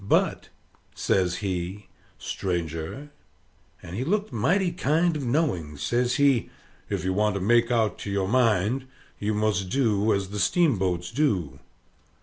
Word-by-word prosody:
But," 100 - +1 0.5
says 90 -2 +1
he, 95 +2 -3 0.3
"stranger," 85 - -4 0.7
and 90 +1 -7
he 120 - -2
looked 205 +2 -1
mighty 175 - +2
kind 170 +1 +1
of 150 - -3
knowing, 115 - 0
says 120 - 0
he, 140 -4 +3 0.4
"if - - -2
you 95 - +1
want 105 +1 +1
to - - -1
make 115 +4 +3
out 110 -5 +1
to - - -5
your 100 -1 0
mind, 115 +2 +2 0.3
you 105 +1 -1
must 105 -3 0
do 110 -5 +2
as 100 -2 0
the 105 +1 -4
steamboats 95 - +1
do." 95 - 0
105 Hz, 140 wpm, -26 LUFS, 95-130 Hz, 0.7 s, he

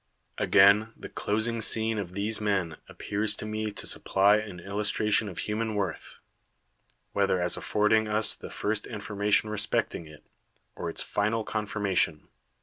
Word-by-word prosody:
Again, 100 +3 +5
the - - -9
closing 110 +2 -1
scene 110 0 +3
of 90 -2 -6
these 105 +2 0
men 95 -6 -1
appears 105 +1 -1
to - - -7
me 110 0 -3
to - - -4
supply 100 +2 +3
an 105 -4 -6
illustration 105 +2 0
of 90 - -10
human 110 +1 -2
worth, 95 -6 -4 1.0
whether 100 -2 +1
as 90 0 +1
affording 110 +1 +1
us 105 +1 +2
the - - -9
first 105 0 -2
information 105 -1 0
re 110 - -2
specting 85 -4 -1
it, 75 -1 -15 0.5
or 85 - -4
its - - -2
final 110 +2 -1
confirmation. 100 -7 -1
105 Hz, 145 wpm, -28 LUFS, 100-110 Hz, 1.0 s, Again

